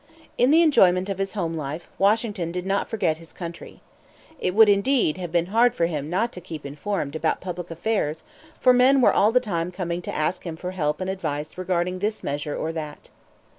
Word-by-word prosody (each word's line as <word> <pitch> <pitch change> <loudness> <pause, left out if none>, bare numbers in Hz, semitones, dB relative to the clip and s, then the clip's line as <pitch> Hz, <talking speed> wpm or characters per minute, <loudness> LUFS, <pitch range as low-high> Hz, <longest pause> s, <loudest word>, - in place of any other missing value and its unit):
In 250 - +3
the 325 +3 +6
enjoyment 190 - +4
of 195 -1 -3
his 195 +2 -2
home 170 -5 -2
life, 155 +2 -5
Washington 205 -4 +1
did 180 +1 -4
not 195 +1 -1
forget 165 -8 0
his 165 0 -13
country. 170 -2 -9 0.6
It 180 - -1
would, 220 0 +8
indeed, 205 - +2
have 175 -3 -5
been 170 0 +2
hard 240 +1 +4
for 170 - +2
him 150 -3 -3
not 215 +7 0
to 180 - -9
keep 160 -4 -8
informed 145 +1 -3
about 160 0 0
public 180 -1 -6
affairs; 165 -3 -2 0.4
for 255 - +5
men 260 +2 +5
were - - +5
all 210 +2 +4
the 250 - +4
time 180 -7 -3
coming 175 -1 -3
to - - -8
him - - -7
to - - -2
ask 170 +4 -1
for 180 +2 -5
help 150 -3 -1
and 185 - -2
advice 155 -5 -4
regarding 180 0 -1
this 210 +2 -2
measure 145 +1 -3
or 160 - -2
that. 150 -2 -7
180 Hz, 210 wpm, -24 LUFS, 160-205 Hz, 0.6 s, would